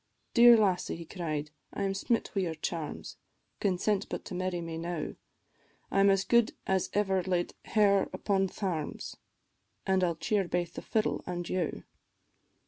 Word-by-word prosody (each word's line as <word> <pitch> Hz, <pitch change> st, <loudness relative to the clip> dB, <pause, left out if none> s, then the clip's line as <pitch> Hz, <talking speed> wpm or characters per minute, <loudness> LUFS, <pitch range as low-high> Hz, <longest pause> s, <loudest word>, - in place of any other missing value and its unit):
"Dear 235 Hz, 0 st, +9 dB
lassie," 190 Hz, -4 st, +1 dB
he 170 Hz, 0 st, -8 dB
cried, 155 Hz, -4 st, -4 dB, 0.2 s
"I 200 Hz, -, -3 dB
am 195 Hz, 0 st, 0 dB
smit 225 Hz, +4 st, 0 dB
wi' 195 Hz, -, +1 dB
your 165 Hz, -3 st, -2 dB
charms, 155 Hz, 0 st, -5 dB, 0.4 s
Consent 200 Hz, +1 st, 0 dB
but -, -, -5 dB
to 205 Hz, -, -7 dB
marry 185 Hz, 0 st, -2 dB
me 165 Hz, -1 st, -5 dB
now, 170 Hz, -2 st, -3 dB, 0.8 s
I -, -, +2 dB
'm 200 Hz, 0 st, +6 dB
as 195 Hz, -1 st, +3 dB
good 235 Hz, 0 st, +3 dB
as 190 Hz, -1 st, +1 dB
ever 195 Hz, -2 st, +2 dB
laid 180 Hz, -1 st, -1 dB
hair 200 Hz, -2 st, +3 dB
upon 195 Hz, -2 st, +1 dB
thairms, 175 Hz, -6 st, -4 dB, 0.7 s
An' 190 Hz, -1 st, +2 dB
I -, -, +4 dB
'll 170 Hz, -, -1 dB
cheer 195 Hz, +3 st, 0 dB
baith 175 Hz, -1 st, -1 dB
the -, -, -6 dB
fiddle 220 Hz, -1 st, 0 dB
an' 175 Hz, -1 st, -3 dB
you." 175 Hz, -2 st, -2 dB
185 Hz, 165 wpm, -30 LUFS, 175-200 Hz, 0.8 s, Dear